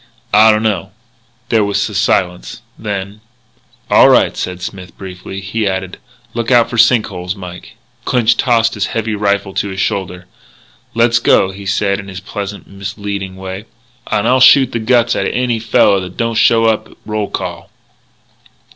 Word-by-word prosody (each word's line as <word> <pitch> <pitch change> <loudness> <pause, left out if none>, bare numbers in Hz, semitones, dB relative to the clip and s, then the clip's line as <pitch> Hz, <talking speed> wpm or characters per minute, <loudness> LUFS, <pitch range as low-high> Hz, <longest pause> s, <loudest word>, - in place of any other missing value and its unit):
"I 110 +2 +7
dunno." 105 -3 -1 0.6
There 110 -2 +3
was 100 0 0
a - - -8
silence. 90 -10 -1
Then, 100 -1 -5 0.7
"All - - +6
right," - - +4
said 90 -1 -4
Smith, 90 -1 -8
briefly. 95 +1 -8
He 105 +2 -2
added: 95 -1 -4 0.3
"Look 115 -1 -3
out 120 -2 +4
for 120 - -3
sink 115 -1 +5
holes, 90 -1 -5
Mike." 90 +1 -10 0.3
Clinch 120 -2 +2
tossed 115 -2 +2
his 105 -3 -2
heavy 110 -1 -1
rifle 100 -1 -1
to 100 - -2
his 95 0 -6
shoulder: 95 -3 -2 0.7
"Let's 115 0 +3
go," 95 -4 +3
he 100 +1 -9
said 100 +1 0
in 100 - -9
his 95 -1 -7
pleasant, 100 +1 -6
misleading 100 -1 -6
way, 95 +2 -7 0.2
" 120 0 -36
and 105 - +1
I'll 130 +1 +4
shoot 130 -1 +6
the 115 - -2
guts 120 +1 +2
outa - - -1
any 125 -2 0
fella 105 -3 +3
that 90 -1 -9
don't 115 -1 -1
show 115 0 +3
up 110 -1 0
at - - -19
roll 105 -1 -3
call." - - -5
100 Hz, 170 wpm, -15 LUFS, 95-115 Hz, 0.7 s, I